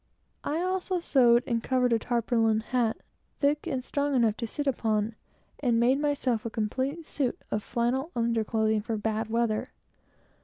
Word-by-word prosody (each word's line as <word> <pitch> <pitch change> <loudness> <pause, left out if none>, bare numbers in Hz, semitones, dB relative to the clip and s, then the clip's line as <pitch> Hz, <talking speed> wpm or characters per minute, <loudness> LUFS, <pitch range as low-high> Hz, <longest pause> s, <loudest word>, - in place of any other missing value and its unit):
I 310 +3 -1
also 370 0 -1
sewed 245 -7 +4
and 230 -1 0
covered 250 0 +2
a 230 - +3
tarpaulin 225 -2 +1
hat, 235 -1 0 0.4
thick 295 +3 +1
and 260 -5 -2
strong 285 -1 0
enough 230 -4 +3
to 230 - -3
sit 290 - -3
down 275 - +2
upon, 220 -1 -1 0.4
and 240 -4 +2
made 255 +4 +3
myself 270 -6 0
a 230 - -3
complete 260 +9 -2
suit 270 -5 -2
of 210 - 0
flannel 245 +7 -1
under 230 -1 +1
clothing, 220 -1 +1
for 220 +1 -3
bad 220 +1 -2
weather. 230 +1 0
235 Hz, 165 wpm, -28 LUFS, 225-275 Hz, 0.4 s, sewed